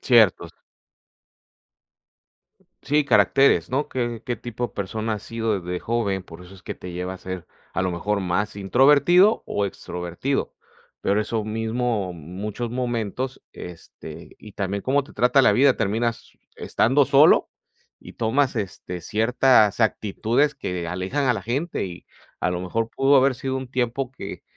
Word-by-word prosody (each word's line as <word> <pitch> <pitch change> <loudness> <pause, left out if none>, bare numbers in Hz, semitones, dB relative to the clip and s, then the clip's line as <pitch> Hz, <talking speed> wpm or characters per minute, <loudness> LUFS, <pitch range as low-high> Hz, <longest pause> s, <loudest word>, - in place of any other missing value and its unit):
Cierto. 115 -7 +4 2.4
Sí, 150 +1 +2
caracteres, 125 - +4
¿no?, 140 +3 -1
qué 120 -3 -3
qué 120 - -2
tipo 120 +1 -4
de - - -20
persona 110 +3 -3
ha - - -4
sido 110 -2 -2
de 90 0 -4
joven, 105 -5 -1
por 90 -1 -12
eso 90 - -14
es 95 - -16
que - - -6
te 90 - -9
lleva 90 +1 -4
a - - -8
ser 95 -1 -7 0.3
a - - -1
lo 95 - 0
mejor 100 +4 -1
más 95 +3 -1
introvertido 145 - +4
o 100 - -1
extrovertido, 90 +7 -3 0.5
pero 100 +2 +1
eso 110 0 -2
mismo, 110 -2 -2
muchos 100 +8 -6
momentos, 125 +1 -3
este, 90 -2 -11
y 105 - -13
también 100 0 -3
cómo 140 +2 +2
te 140 - -16
trata 125 +3 +4
la - - +5
vida, 135 0 +4
terminas 115 +4 -1 0.2
estando 135 +4 +2
solo 145 +3 +5 0.5
y - - -12
tomas 130 +4 +1
este 90 -4 -5
ciertas 110 +2 +3
actitudes 115 +6 +1
que 90 -2 -4
alejan 95 +11 -2
a 125 - +3
la 110 - -4
gente. 135 - -2
Y 90 -2 -10 0.4
a 90 - +1
lo 90 0 -2
mejor, 110 +5 -2
pudo 135 +1 +4
haber 135 0 +4
sido 130 +2 -3
un 130 -1 -6
tiempo 125 0 -1
que - - -8
115 Hz, 155 wpm, -23 LUFS, 95-130 Hz, 2.4 s, la